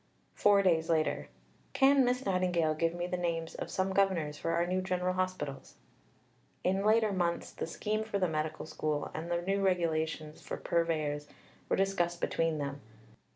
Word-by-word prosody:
Four 200 Hz, -1 st, +4 dB
days 165 Hz, -3 st, +2 dB
later: 160 Hz, -2 st, +1 dB, 0.4 s
"Can 275 Hz, 0 st, +5 dB
Miss 250 Hz, +1 st, 0 dB
Nightingale 180 Hz, -4 st, +2 dB
give 165 Hz, +2 st, 0 dB
me 175 Hz, 0 st, -2 dB
the 180 Hz, 0 st, -2 dB
names 165 Hz, -2 st, -2 dB
of -, -, -5 dB
some 190 Hz, 0 st, -1 dB
Governors 185 Hz, -7 st, +2 dB
for 165 Hz, -, -4 dB
our 170 Hz, +1 st, +2 dB
new 185 Hz, +1 st, 0 dB
General 185 Hz, -1 st, 0 dB
Hospitals?" 185 Hz, -7 st, -3 dB, 0.9 s
In 190 Hz, +2 st, +1 dB
later 215 Hz, 0 st, +4 dB
months, 175 Hz, -3 st, -1 dB
the -, -, -5 dB
scheme 215 Hz, +6 st, -2 dB
for 215 Hz, -2 st, -2 dB
the 185 Hz, -2 st, +2 dB
Medical 155 Hz, -1 st, -2 dB
School 155 Hz, -1 st, -2 dB
and 160 Hz, +2 st, -5 dB
the 175 Hz, 0 st, 0 dB
new 195 Hz, +2 st, 0 dB
Regulations 160 Hz, -4 st, 0 dB
for -, -, -5 dB
Purveyors 155 Hz, -3 st, 0 dB, 0.4 s
were -, -, +3 dB
discussed 175 Hz, -3 st, 0 dB
between 165 Hz, -2 st, 0 dB
them. 140 Hz, -1 st, -4 dB
175 Hz, 165 wpm, -32 LUFS, 160-190 Hz, 0.9 s, Can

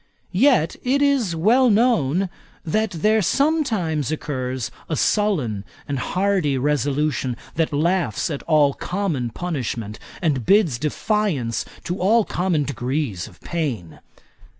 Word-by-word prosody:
Yet, 210 Hz, -, +3 dB
it 265 Hz, +3 st, +1 dB
is 260 Hz, -11 st, +2 dB
well 235 Hz, +10 st, +4 dB
known, 195 Hz, -, +2 dB, 0.4 s
that 215 Hz, +7 st, +1 dB
there 210 Hz, +5 st, +2 dB
sometimes 220 Hz, -, +1 dB
occurs 130 Hz, -5 st, -3 dB, 0.2 s
a 160 Hz, -, 0 dB
sullen 150 Hz, -, +1 dB, 0.2 s
and 140 Hz, -2 st, -2 dB
hardy 185 Hz, -5 st, 0 dB
resolution, 145 Hz, -1 st, 0 dB, 0.2 s
that 165 Hz, -1 st, 0 dB
laughs 170 Hz, +3 st, 0 dB
at 140 Hz, -, -4 dB
all 150 Hz, -3 st, +4 dB
common 170 Hz, -11 st, -2 dB
punishment, 115 Hz, -, -4 dB, 0.2 s
and 145 Hz, -8 st, 0 dB
bids 175 Hz, -, +3 dB
defiance 155 Hz, -, -1 dB, 0.2 s
to 175 Hz, +2 st, -3 dB
all 215 Hz, +4 st, +3 dB
common 175 Hz, -3 st, 0 dB
degrees 130 Hz, -, -2 dB
of -, -, -17 dB
pain. 130 Hz, -, -4 dB
160 Hz, 120 wpm, -22 LUFS, 135-205 Hz, 0.4 s, well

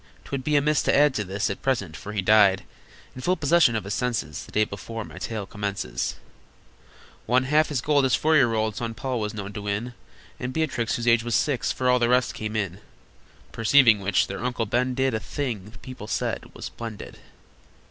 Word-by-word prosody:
'Twould 135 Hz, -2 st, -4 dB
be 150 Hz, +2 st, +1 dB
amiss 150 Hz, +1 st, +3 dB
to -, -, +2 dB
add 145 Hz, 0 st, +5 dB
to 105 Hz, -, -1 dB
this 100 Hz, +1 st, -2 dB
At 100 Hz, -, -6 dB
present, 100 Hz, -, -1 dB
for 105 Hz, -, -8 dB
he 105 Hz, -2 st, -2 dB
died, 100 Hz, -1 st, +5 dB, 0.5 s
In 130 Hz, -, -9 dB
full 180 Hz, +7 st, +2 dB
possession 160 Hz, -6 st, +4 dB
of 110 Hz, -, -1 dB
his 100 Hz, +1 st, -4 dB
senses, 120 Hz, -11 st, -2 dB
The -, -, -14 dB
day 110 Hz, -, +3 dB
before 105 Hz, +2 st, -6 dB
my -, -, -11 dB
tale 110 Hz, -3 st, -4 dB
commences. 100 Hz, -12 st, -3 dB, 1.1 s
One 125 Hz, +2 st, +3 dB
half 150 Hz, +4 st, +3 dB
his 140 Hz, -6 st, -1 dB
gold 145 Hz, +1 st, +3 dB
his 130 Hz, -3 st, +3 dB
four 155 Hz, +5 st, +2 dB
year 120 Hz, -6 st, +4 dB
old 110 Hz, -1 st, 0 dB
Son 115 Hz, 0 st, -4 dB
Paul 130 Hz, -1 st, -2 dB
was 105 Hz, 0 st, -3 dB
known 100 Hz, -1 st, -6 dB
to 105 Hz, -, -5 dB
win, 105 Hz, +4 st, -3 dB, 0.5 s
And 125 Hz, 0 st, -4 dB
Beatrix, 130 Hz, -8 st, -1 dB
whose 120 Hz, 0 st, -3 dB
age 115 Hz, -1 st, +5 dB
was 120 Hz, -1 st, -1 dB
six, 145 Hz, -5 st, +1 dB
For 130 Hz, -, -2 dB
all 125 Hz, 0 st, +4 dB
the 120 Hz, 0 st, +2 dB
rest 125 Hz, 0 st, +2 dB
came 110 Hz, 0 st, -5 dB
in, 100 Hz, -3 st, -2 dB, 0.7 s
Perceiving 115 Hz, -1 st, +5 dB
which, 100 Hz, -1 st, +2 dB
their 100 Hz, +3 st, -6 dB
Uncle 125 Hz, -2 st, -1 dB
Ben 125 Hz, +4 st, 0 dB
did 130 Hz, -1 st, +1 dB
A 110 Hz, -, 0 dB
thing 115 Hz, -5 st, -4 dB
that 110 Hz, +2 st, -15 dB
people 130 Hz, -5 st, -8 dB
said -, -, -2 dB
was -, -, -7 dB
splendid. 115 Hz, -3 st, -8 dB
115 Hz, 210 wpm, -25 LUFS, 105-130 Hz, 1.1 s, add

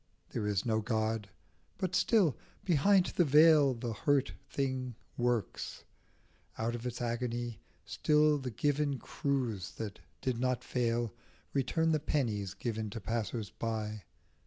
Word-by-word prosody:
There 105 Hz, -, -2 dB
is 100 Hz, -2 st, 0 dB
no 110 Hz, -2 st, +2 dB
God; 110 Hz, -2 st, -1 dB, 0.5 s
but 185 Hz, -1 st, -2 dB
still, 185 Hz, -, +4 dB, 0.3 s
behind 185 Hz, +3 st, +4 dB
the 175 Hz, -, +6 dB
veil, 150 Hz, -2 st, +6 dB
The 115 Hz, -1 st, -3 dB
hurt 140 Hz, +6 st, +1 dB, 0.2 s
thing 130 Hz, -3 st, -2 dB, 0.2 s
works, 120 Hz, -4 st, -1 dB, 0.7 s
out 115 Hz, +1 st, -1 dB
of 120 Hz, +1 st, -4 dB
its 120 Hz, 0 st, -4 dB
agony. 120 Hz, -1 st, -2 dB, 0.3 s
Still 150 Hz, 0 st, +3 dB
like 145 Hz, -, -1 dB
the 130 Hz, -, -3 dB
given 145 Hz, +4 st, 0 dB
cruse 120 Hz, -11 st, -2 dB
that 105 Hz, -5 st, -6 dB, 0.2 s
did 125 Hz, -3 st, -1 dB
not 125 Hz, -1 st, 0 dB
rail 120 Hz, -3 st, +1 dB, 0.4 s
Return 160 Hz, +4 st, +2 dB
the 155 Hz, -, +3 dB
pennies 110 Hz, -10 st, -1 dB
given 110 Hz, -2 st, -3 dB
to 110 Hz, -, -5 dB
passers 110 Hz, -2 st, -3 dB
by. 110 Hz, -2 st, -3 dB
120 Hz, 135 wpm, -32 LUFS, 110-145 Hz, 0.7 s, the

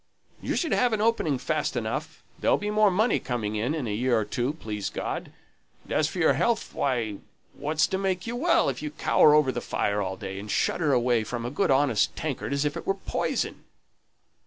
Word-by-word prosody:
"You -, -, -2 dB
should 330 Hz, -, -1 dB
have 245 Hz, -2 st, +2 dB
an 215 Hz, -, 0 dB
opening 215 Hz, -, +1 dB
fast -, -, -1 dB
enough. -, -, -4 dB, 0.2 s
There'll -, -, +3 dB
be 210 Hz, 0 st, -3 dB
more 210 Hz, -1 st, +4 dB
money 215 Hz, +6 st, +2 dB
coming 110 Hz, -4 st, -3 dB
in, 120 Hz, +9 st, -1 dB
in 150 Hz, -5 st, -3 dB
a 105 Hz, -, -2 dB
year 120 Hz, +2 st, +1 dB
or 110 Hz, -, 0 dB
two, 125 Hz, +6 st, -1 dB
please 105 Hz, -9 st, -4 dB
God. -, -, -4 dB, 0.5 s
And -, -, -6 dB
as 155 Hz, -, +2 dB
for 170 Hz, -, -7 dB
your 160 Hz, -5 st, +4 dB
health, 220 Hz, -, 0 dB
why, 120 Hz, -7 st, -1 dB, 0.4 s
what's 155 Hz, +1 st, +1 dB
to 190 Hz, -, -2 dB
make 190 Hz, -2 st, -1 dB
you 235 Hz, +1 st, -3 dB
well, 330 Hz, +8 st, +3 dB
if 130 Hz, -3 st, -2 dB
you 150 Hz, -, -3 dB
cower 150 Hz, 0 st, +4 dB
over 150 Hz, -3 st, +4 dB
the 120 Hz, -, -4 dB
fire 105 Hz, 0 st, -1 dB
all 95 Hz, -1 st, -3 dB
day, 95 Hz, -1 st, -6 dB
and 105 Hz, +1 st, -8 dB
shudder 150 Hz, +7 st, +1 dB
away 120 Hz, -3 st, +2 dB
from 115 Hz, +2 st, -4 dB
a 120 Hz, -, -3 dB
good 145 Hz, -, 0 dB
honest 130 Hz, -6 st, +2 dB
tankard 145 Hz, -3 st, -3 dB
as 140 Hz, +1 st, 0 dB
if 145 Hz, -, -1 dB
it -, -, -7 dB
were 195 Hz, -, +2 dB
poison?" 195 Hz, -, -2 dB
140 Hz, 215 wpm, -26 LUFS, 115-180 Hz, 0.5 s, more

